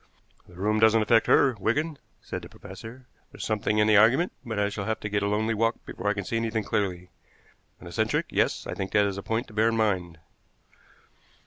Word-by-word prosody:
"The 90 - -16
room 105 +4 0
doesn't 110 0 +5
affect 115 +1 +3
her, 130 - +5
Wigan," 145 +8 -1 0.2
said - - -5
the - - -11
professor. 110 +6 -11 0.3
"There's - - -7
something 105 -1 0
in 105 - +4
the 110 -1 +5
argument, 125 - +4
but 115 -4 -5
I 100 0 +1
shall 100 -1 -5
have 110 -1 -2
to 105 - -4
get 105 0 0
a 100 - 0
lonely 110 +2 0
walk 115 +2 +1
before - - -6
I 105 - +2
can 100 -2 -4
see 115 - -2
anything 115 -1 -1
clearly. 90 -4 -2 0.7
An - - -13
eccentric; - - -1
yes, - - 0
I - - -4
think 95 -1 -5
that 105 -1 +4
is 100 -1 -2
a - - -6
point 115 +5 -2
to - - -14
bear 110 +2 +3
in 115 - -1
mind." 95 -6 0
110 Hz, 220 wpm, -26 LUFS, 100-115 Hz, 0.7 s, doesn't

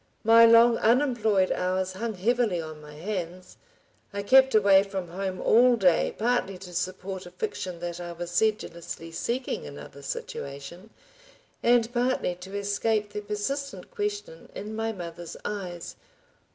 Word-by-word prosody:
My 230 +1 +8
long 230 +1 +6
unemployed 225 -6 +3
hours 185 +1 -1
hung 220 +3 -4
heavily 220 -1 +1
on 155 -1 -7
my 150 0 -12
hands. 180 +1 -5 0.5
I 200 0 -4
kept 265 +3 +5
away 200 -2 +6
from 195 -3 -5
home 185 +1 -4
all 245 +2 +5
day, 185 -6 +2
partly 225 -4 0
to 180 -1 -11
support 185 +1 -4
a - - -9
fiction 185 - -5
that 175 0 -4
I 175 -1 -6
was 175 0 -6
sedulously 175 -5 -1
seeking 240 +10 -3
another 140 0 -10
situation, 140 +7 -7 0.7
and 240 0 +3
partly 245 -6 +1
to 190 +3 -8
escape 205 +1 0
the 210 - -3
persistent 275 +8 -4
question 415 +4 -4
in 215 +2 -6
my 225 0 -1
mother's 175 -4 -8
eyes. 180 -5 -5
200 Hz, 140 wpm, -27 LUFS, 175-230 Hz, 0.7 s, My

